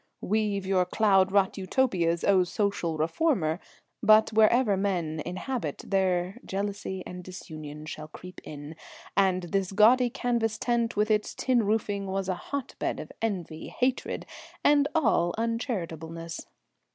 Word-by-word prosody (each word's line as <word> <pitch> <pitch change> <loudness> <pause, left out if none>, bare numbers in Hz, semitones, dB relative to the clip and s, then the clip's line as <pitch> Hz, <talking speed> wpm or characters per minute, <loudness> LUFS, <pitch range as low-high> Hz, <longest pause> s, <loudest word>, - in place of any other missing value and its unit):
Weave 205 -2 0
your 190 -1 +3
cloud 195 0 +3
wrought 195 0 +2
Utopias, 185 -6 +1
O 190 -2 +5
social 180 -3 -1
reformer, 165 - +1 0.4
but 215 +1 +5
wherever 220 0 +4
men 175 -6 -1
inhabit, 185 - -4
there 190 +1 0
jealousy 195 -1 -3
and 180 0 -8
disunion 155 -4 -8
shall 155 0 -7
creep 180 +4 -11
in, 145 +1 -8 0.4
and 190 -1 +3
this 190 +2 -1
gaudy 240 +5 +5
canvas 230 -2 -1
tent 235 -1 0
with 210 +1 +2
its 210 -1 +1
tin 250 -3 +2
roofing 205 -2 0
was 190 0 -2
a 185 - +1 0.2
hotbed 280 -2 -3
of - - -8
envy, 180 -8 -3
hatred, 255 0 -1 0.4
and 290 -1 +5
all 220 - +2
uncharitableness. 170 - -3
195 Hz, 130 wpm, -28 LUFS, 175-220 Hz, 0.4 s, O